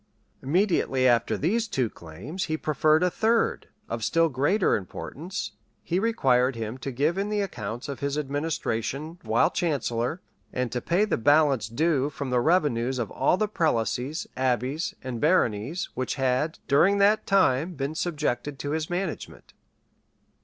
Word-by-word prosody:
Immediately 145 -5 +2
after 120 -2 +2
these 220 +9 0
two 130 - 0
claims, 105 - -6
he 155 -1 -2
preferred 155 +2 +2
a 180 - +2
third, 225 +4 +1 0.2
of 115 - -4
still 165 +7 +3
greater 150 - +2
importance; 155 - -5 0.3
he 175 +2 0
required 135 - +2
him 115 +2 -5
to 135 - -4
give 150 +9 0
in 200 +1 -1
the 210 -1 0
accounts 115 - -5
of 140 - -5
his 140 0 -2
administration 150 +1 -3
while 160 - +2
chancellor, 140 -2 -1 0.3
and 125 -1 -2
to 125 - -2
pay 185 +5 +2
the 215 - 0
balance 145 -3 +3
due 145 +2 +1
from 140 -2 -5
the 125 - +3
revenues 135 -6 +2
of 120 -4 -3
all - - +2
the 215 - +1
prelacies, 150 - -1
abbeys, 130 - -1
and 125 -3 -5
baronies, 150 - +1
which 130 0 -2
had, 135 +3 0
during 175 +9 +4
that 210 +2 +3
time, 175 -3 +2
been 140 +2 -3
subjected 150 -4 -2
to 145 +2 -4
his 155 0 -2
management. 175 0 -5
145 Hz, 155 wpm, -26 LUFS, 125-175 Hz, 0.3 s, during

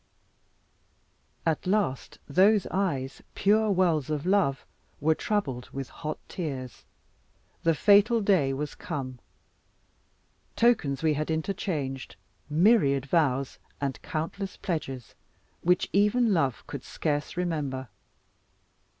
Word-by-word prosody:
At 160 +2 0
last 190 -10 0
those 195 +6 +4
eyes, 155 -9 -1
pure 215 +2 +3
wells 175 -7 +2
of 150 0 -2
love, 185 -8 +2 0.3
were 160 +2 +3
troubled 140 - -2
with 135 -1 -6
hot 155 -1 -5
tears. 135 - -5 0.8
The 165 -1 +2
fatal 205 +6 +5
day 190 -10 +3
was 145 +2 -3
come. 130 -3 -5 1.4
Tokens 155 - +2
we 155 -1 +3
had 150 +2 -2
interchanged, 160 - -3 0.3
myriad 150 - +4
vows, 140 -4 +1 0.2
and 140 -2 -3
countless 185 +4 -4
pledges, 135 - -4 0.5
which 180 +1 +2
even 210 +3 +3
love 140 -8 0
could 140 -3 -7
scarce 150 +1 -2
remember. 145 -7 -2
155 Hz, 105 wpm, -28 LUFS, 135-195 Hz, 1.4 s, fatal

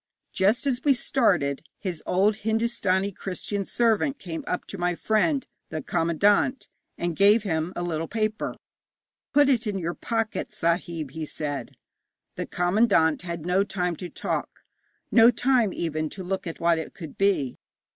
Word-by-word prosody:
Just 200 +8 +2
as 260 -1 0
we 285 - +5
started, 180 - +1
his 180 -6 -4
old 200 +3 +3
Hindostani 220 -3 0
Christian 195 +2 -4
servant 235 +6 +1
came 165 -3 -6
up - - -2
to 200 - -8
my 175 0 +1
friend, 220 - +1 0.2
the 155 -2 -4
commandant, 200 - +2 0.3
and 175 -1 -2
gave 205 +4 +5
him 160 -3 -1
a 175 - -2
little 165 -2 -2
paper. 215 -1 -2 0.8
'Put 290 0 +5
it 245 -4 +2
in 205 -2 -1
your 170 -2 -2
pocket, 225 +1 -2
sahib,' 165 -3 -1
he 155 +1 -5
said. 145 -5 -4 0.6
The - - -4
commandant 175 -3 +3
had 170 -2 -5
no 180 +2 +3
time 180 -3 -2
to 180 - -6
talk, - - -4 0.5
no 230 0 +8
time 245 -3 +2
even 155 -3 -2
to 190 - -5
look 190 0 -3
at 165 - -6
what 170 -1 +3
it 160 - -7
could 160 -5 -9
be. 195 -11 +1
190 Hz, 155 wpm, -26 LUFS, 165-220 Hz, 0.8 s, no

